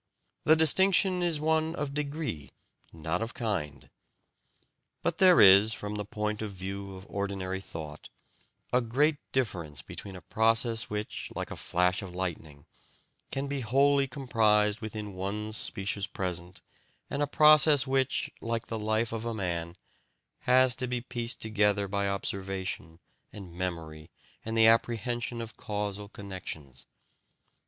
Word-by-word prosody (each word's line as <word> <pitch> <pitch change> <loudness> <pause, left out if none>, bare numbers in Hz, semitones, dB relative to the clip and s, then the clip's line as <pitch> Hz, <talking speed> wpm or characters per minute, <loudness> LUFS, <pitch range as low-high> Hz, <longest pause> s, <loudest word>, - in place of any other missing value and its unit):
The 155 - +7
distinction 185 +3 +4
is 170 -3 0
one 160 +1 +1
of 145 -3 -3
degree, 145 - -3 0.4
not 80 +4 -3
of 115 +1 -4
kind. 80 - -3 1.2
But - - -1
there 185 -2 +7
is, 100 +3 +8
from 105 0 -5
the 105 -1 -3
point 105 +1 -3
of 110 -2 -4
view 95 +1 -6
of 95 +1 -11
ordinary 95 -1 -3
thought, 80 -5 -8 0.6
a 125 - +4
great 145 +6 +2
difference 85 - -2
between 100 -2 -8
a 90 - -9
process 115 +5 +1
which, 105 0 -4
like - - -4
a - - -4
flash 90 +1 +1
of 90 -3 -8
lightning, 80 -6 -5 0.6
can 135 +1 -2
be 140 -1 -3
wholly 140 +4 +3
comprised 110 -5 +2
within 105 -2 -5
one 105 +3 -4
specious 100 -2 0
present 90 -2 -5 0.4
and 140 - -3
a 145 - +2
process 150 -1 +6
which, 135 0 0
like 115 0 -2
the 115 - -3
life 110 +1 0
of 115 -1 -3
a 115 -1 -3
man, 85 -4 -3 0.7
has 130 0 +6
to 130 -1 +1
be 125 0 -2
pieced 120 -1 -3
together 105 -2 +1
by 100 +1 -1
observation 95 -4 -3 0.3
and 95 -5 -10
memory 80 -4 -5 0.3
and 115 +1 -3
the 110 - +6
apprehension 115 +1 +1
of 110 -1 -8
causal 105 -1 -4
connections. 80 -10 -8
105 Hz, 140 wpm, -29 LUFS, 95-125 Hz, 1.2 s, is